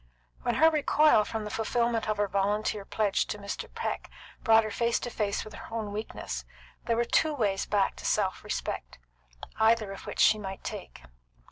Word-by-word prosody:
When - - 0
her 320 +1 +6
recoil 300 -6 +4
from 220 +1 -4
the 210 - -5
fulfilment 230 0 0
of 215 - 0
her 205 0 +1
volunteer 200 +1 0
pledge 210 -2 +1
to - - -4
Mr. 200 -1 -6
Peck - - -4 0.3
brought 225 -1 +6
her 215 - -4
face 235 +2 +1
to 245 - -4
face 205 -3 -1
with 215 - -10
her - - -10
own 220 -2 -3
weakness, 215 +2 -5 0.4
there 230 - +1
were 235 - +2
two 310 +5 +2
ways 200 -6 0
back 200 -2 +1
to - - -9
self - - 0
respect, - - -4 0.6
either 220 -2 +3
of 195 - -9
which - - -6
she 215 - +6
might 195 -2 -6
take. - - -7
215 Hz, 190 wpm, -29 LUFS, 205-230 Hz, 0.6 s, her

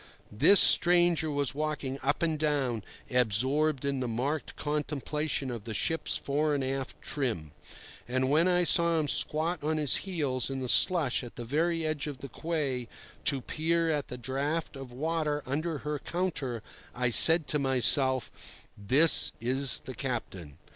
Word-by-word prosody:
This 155 - +5
stranger 175 -2 +4
was 145 -3 -1
walking 145 -2 -4
up 145 +4 -1
and 160 -2 -1
down 135 -8 -1 0.3
absorbed 130 +5 0
in 140 -1 -2
the 125 - -3
marked 135 +6 -3
contemplation 150 -1 -3
of 115 -3 -7
the 110 -2 -6
ship's 160 +10 -1
fore 150 +1 -1
and 140 - -2
aft 135 0 -4
trim; 115 - -4 0.6
but 130 +1 0
when 155 +6 +2
I 180 -1 +2
saw 170 -1 +2
him 150 - -2
squat 160 +5 +1
on 155 +1 -1
his 150 -3 +2
heels 140 - -2
in 135 0 -4
the 130 - -4
slush 150 -2 +3
at 120 - -11
the 120 - -7
very 165 +5 -1
edge 155 -1 -3
of 145 -3 -6
the 140 0 -10
quay 140 -5 -3 0.4
to 140 -2 +1
peer 165 +4 -1
at 150 -2 -2
the 125 - -7
draught 140 +7 -3
of 135 -2 -9
water 150 +2 -2
under 155 +4 -3
her 150 -1 -3
counter, 140 -10 -3 0.3
I 125 0 -1
said 160 +6 +7
to 150 - +1
myself, 130 -1 +2 0.4
"This 135 +11 +5
is 130 +3 +1
the 130 - -9
captain." 95 - -6
145 Hz, 160 wpm, -28 LUFS, 130-155 Hz, 0.6 s, said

